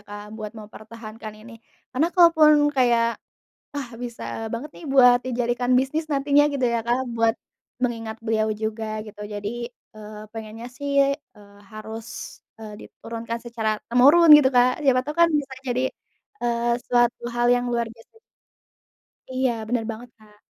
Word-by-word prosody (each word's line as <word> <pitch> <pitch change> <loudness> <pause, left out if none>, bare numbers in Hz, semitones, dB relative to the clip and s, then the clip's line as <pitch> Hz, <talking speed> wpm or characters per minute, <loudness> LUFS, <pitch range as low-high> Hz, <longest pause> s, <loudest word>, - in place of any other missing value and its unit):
Kak, 205 0 -8
buat 215 -1 -7
mempertahankan 215 +1 -10
ini. 235 - -12 0.4
Karena 300 +6 +1
kalaupun 305 -4 +5
kayak, 235 -2 +2 0.5
ah, 285 -4 -5
bisa 240 -1 -7 0.3
banget 260 +6 -5
nih 335 - -12
buat 250 -2 +7
dijadikan 245 0 -1
bisnis 270 +5 +1
nantinya 285 +1 +3
gitu 275 -2 -1
ya, 235 -1 0
Kak, 250 +2 0
buat 225 0 +3 0.5
mengingat 225 -3 -2
beliau 220 -1 0
juga 220 +1 -4 0.2
gitu 210 0 -12
jadi, 205 0 -5 0.5
eee, 210 0 -10
pengennya 225 +1 -8
sih, 280 0 +1 0.2
eee, 200 -1 -18
harus, 220 +1 -8 0.5
eee, 215 -1 -8
diturunkan 230 0 -7
secara 230 -2 -2 0.2
temurun 285 +8 +6
gitu, 285 -3 +5
Kak. 250 +4 +3
Siapa 255 -2 +4
tahu 300 +2 -6
kan 340 - +7
bisa 275 -1 -11 0.2
jadi, 250 +1 0 0.6
eee, 235 0 0 0.2
suatu 240 -1 +2
hal 240 0 +1
yang 245 - -2
luar 235 -1 0
biasa. 225 - -21 1.2
Iya, 260 0 +1 0.2
bener 235 -1 0
banget, 230 +3 -9
Kak. 210 -1 -21
235 Hz, 145 wpm, -23 LUFS, 220-260 Hz, 1.2 s, buat